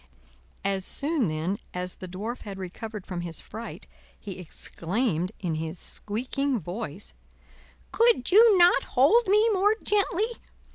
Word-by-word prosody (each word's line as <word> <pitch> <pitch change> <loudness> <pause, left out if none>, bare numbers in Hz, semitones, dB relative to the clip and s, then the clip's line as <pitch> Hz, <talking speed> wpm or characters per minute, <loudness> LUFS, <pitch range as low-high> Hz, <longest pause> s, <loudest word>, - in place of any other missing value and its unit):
As 195 -1 +1
soon 285 - +2
then 165 +6 -2 0.2
as 180 0 -3
the 185 - -9
Dwarf 210 +7 -5
had 200 -2 -7
recovered 200 +2 -7
from 180 -2 -4
his 170 -2 -5
fright, 230 +1 -8 0.3
he 195 -3 -8
exclaimed 180 +2 -2
in 175 -4 -2
his 160 +2 -3
squeaking 255 +8 -2
voice: 185 +1 -6 0.8
"Could 455 - +3
you 430 +1 +7
not 350 -5 +6 0.2
hold 370 - +5
me 425 +3 +4
more 410 +2 +3
gently? 415 +2 +1
220 Hz, 135 wpm, -27 LUFS, -, 0.8 s, you